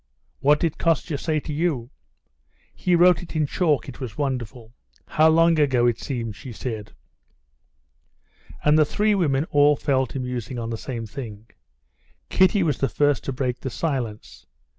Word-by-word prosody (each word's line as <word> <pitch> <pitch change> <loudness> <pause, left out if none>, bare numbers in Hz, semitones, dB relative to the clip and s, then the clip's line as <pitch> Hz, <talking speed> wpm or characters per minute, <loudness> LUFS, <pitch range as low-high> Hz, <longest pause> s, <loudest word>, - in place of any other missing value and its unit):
"What 150 +2 +4
did 165 -3 -1
Kostya 165 -2 0
say 155 -2 0
to 150 - -6
you?" 145 -6 -1 0.8
"He 180 -1 +1
wrote 175 -1 +5
it 175 -1 -10
in 155 -1 +2
chalk. 150 -3 0
It - - -9
was 120 -5 -7
wonderful.... 125 -4 -4 0.4
How 155 +1 +4
long 165 0 +4
ago 130 -5 +3
it 120 -2 +1
seems!" 115 -6 -4
she 125 +5 -9
said. 110 -2 -6 1.7
And 150 +1 +4
the - - +7
three 210 +7 +1
women 150 -7 +1
all 145 0 +5
fell 130 -2 0
to 135 - -6
musing 125 -1 -4
on 115 -1 -4
the - - -2
same 115 0 -5
thing. 110 -3 -8 0.8
Kitty 190 +1 +3
was 150 -5 0
the 135 - +1
first 145 -2 +1
to - - -2
break 125 -1 -2
the 130 - -4
silence. 115 - -4
140 Hz, 165 wpm, -23 LUFS, 120-155 Hz, 1.7 s, the